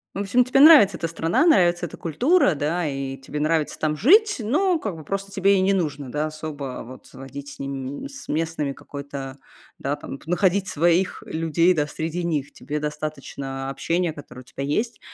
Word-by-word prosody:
В -, -, -4 dB
общем, 225 Hz, +5 st, +3 dB
тебе 255 Hz, +2 st, +1 dB
нравится 295 Hz, -9 st, +8 dB
эта 165 Hz, -, -2 dB
страна, 165 Hz, -, +1 dB
нравится 175 Hz, -, +4 dB
эта 155 Hz, -, -8 dB
культура, 190 Hz, -, +2 dB
да, 155 Hz, +3 st, -1 dB
и 135 Hz, -1 st, -4 dB
тебе 145 Hz, +2 st, -6 dB
нравится 155 Hz, 0 st, 0 dB
там 155 Hz, -1 st, 0 dB
жить, 415 Hz, -, +5 dB
но 315 Hz, -, +1 dB
как 205 Hz, -, -4 dB
бы 155 Hz, -, -10 dB
просто 195 Hz, +4 st, -4 dB
тебе 195 Hz, 0 st, +3 dB
и -, -, +2 dB
не 195 Hz, +1 st, +3 dB
нужно, 145 Hz, -7 st, -2 dB
да, 150 Hz, +1 st, -1 dB
особо 155 Hz, -4 st, -6 dB
вот 130 Hz, +2 st, -12 dB
водить 140 Hz, +2 st, -9 dB
с -, -, -17 dB
ними, 140 Hz, -, -5 dB
с 280 Hz, 0 st, -11 dB
м -, -, -1 dB
местными 160 Hz, -3 st, -2 dB
какой-то, 140 Hz, -1 st, -8 dB, 0.4 s
да, 140 Hz, +2 st, -2 dB
там 135 Hz, -, -8 dB
находить 190 Hz, +3 st, +1 dB
своих 175 Hz, +2 st, +1 dB
людей, 165 Hz, +2 st, +2 dB
да, 150 Hz, -2 st, +1 dB
среди 165 Hz, +3 st, -4 dB
них. 150 Hz, -4 st, -2 dB
Тебе 150 Hz, +1 st, -5 dB
достаточно 140 Hz, -3 st, -5 dB
общения, 170 Hz, +4 st, -1 dB
которое 130 Hz, -4 st, -11 dB
у -, -, -15 dB
тебя 135 Hz, +2 st, -7 dB
есть. 215 Hz, -, -1 dB
160 Hz, 190 wpm, -23 LUFS, 140-195 Hz, 0.4 s, нравится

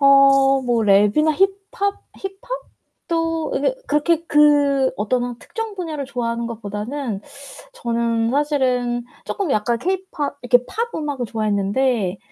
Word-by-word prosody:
어 275 Hz, -1 st, +6 dB
뭐 240 Hz, -2 st, +1 dB
랩이나 210 Hz, +10 st, +4 dB
힙합, 390 Hz, +3 st, 0 dB, 0.2 s
힙합도 385 Hz, -7 st, -4 dB
이게 290 Hz, -, +1 dB
그렇게 310 Hz, +3 st, +1 dB
그 285 Hz, -3 st, +4 dB
어떤 240 Hz, +4 st, 0 dB
한 245 Hz, -1 st, -5 dB
특정 450 Hz, -2 st, -6 dB
분야를 320 Hz, -7 st, -4 dB
좋아하는 235 Hz, -2 st, -3 dB
것보다는 220 Hz, +1 st, -4 dB, 0.5 s
저는 230 Hz, -, 0 dB
사실은 255 Hz, -4 st, +1 dB, 0.2 s
쪼끔 390 Hz, -6 st, -2 dB
약간 230 Hz, +1 st, +1 dB
케이팝 350 Hz, -3 st, -3 dB
이렇게 245 Hz, 0 st, +4 dB
팝 470 Hz, +1 st, -3 dB
음악을 290 Hz, -5 st, -3 dB
좋아했는데 210 Hz, -1 st, 0 dB
275 Hz, 275 characters per minute, -21 LUFS, 235-320 Hz, 0.5 s, 어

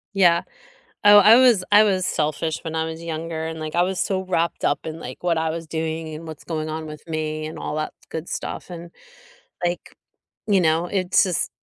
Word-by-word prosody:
Yeah. 175 Hz, -3 st, +5 dB, 0.6 s
Oh, 205 Hz, 0 st, +9 dB
I 210 Hz, +2 st, +8 dB
was 245 Hz, -6 st, +5 dB
I 205 Hz, +1 st, +8 dB
was 190 Hz, -3 st, +1 dB
selfish 155 Hz, +1 st, -1 dB
when 160 Hz, -1 st, -5 dB
I 160 Hz, 0 st, 0 dB
was 160 Hz, 0 st, -6 dB
younger, 165 Hz, -1 st, -4 dB
and, 160 Hz, 0 st, -6 dB
like, 155 Hz, -1 st, -5 dB
I 175 Hz, -, +4 dB
was 185 Hz, +1 st, 0 dB
so 190 Hz, -1 st, 0 dB
wrapped 170 Hz, -2 st, -1 dB
up 145 Hz, -, 0 dB
in, 160 Hz, +1 st, -6 dB
like, 130 Hz, +2 st, -9 dB
what 170 Hz, -2 st, +1 dB
I 160 Hz, 0 st, 0 dB
was 165 Hz, +1 st, -4 dB
doing, 160 Hz, 0 st, -4 dB
and 160 Hz, +2 st, -8 dB
what's 155 Hz, -1 st, -9 dB
going 155 Hz, -2 st, -4 dB
on 160 Hz, 0 st, -4 dB
with 150 Hz, -1 st, -9 dB
me, 155 Hz, -1 st, -3 dB
and 155 Hz, -, -8 dB
all -, -, -4 dB
that 155 Hz, -, -3 dB, 0.2 s
good 160 Hz, +1 st, -6 dB
stuff, -, -, -5 dB
and, 170 Hz, -1 st, -9 dB, 0.7 s
like, 175 Hz, 0 st, -3 dB, 0.5 s
you 205 Hz, -3 st, +3 dB
know, 165 Hz, +1 st, +2 dB
it's 185 Hz, -1 st, +2 dB
just 180 Hz, -5 st, -1 dB
165 Hz, 210 wpm, -23 LUFS, 155-180 Hz, 0.7 s, Oh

